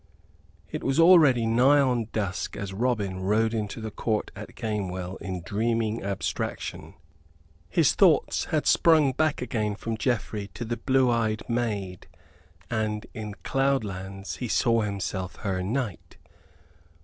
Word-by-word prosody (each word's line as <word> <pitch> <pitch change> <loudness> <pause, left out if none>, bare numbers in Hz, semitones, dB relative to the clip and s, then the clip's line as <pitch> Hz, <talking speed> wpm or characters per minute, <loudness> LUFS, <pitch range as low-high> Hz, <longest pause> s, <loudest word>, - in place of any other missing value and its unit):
It - - -4
was 135 +3 +1
already 155 -9 +6
nigh 125 +6 +5
on 125 -5 +1
dusk 100 -1 -3
as 100 -1 -5
Robin 105 -4 -1
rode 110 +4 +1
into 110 -1 -3
the 110 -1 -5
court 110 +1 -2
at - - -9
Gamewell 95 -4 -3
in 95 -3 -5
dreaming 115 +2 -1
abstraction. 100 0 -4 0.7
His 160 - +3
thoughts 180 -6 +3
had 155 -2 -1
sprung 155 -5 +5
back 150 +1 0
again 105 -4 -1
from 115 +2 -4
Geoffrey 110 -4 -1
to 120 - -4
the 120 +1 -3
blue 130 -2 +2
eyed 110 -2 -1
maid: 105 -6 -2 0.6
and 110 -2 -2
in 105 -2 -6
cloudlands 100 -8 -2
he 125 - -4
saw 115 +1 +2
himself 95 -3 -3
her 95 -3 -2
knight. 110 0 -4
110 Hz, 135 wpm, -26 LUFS, 100-125 Hz, 0.7 s, already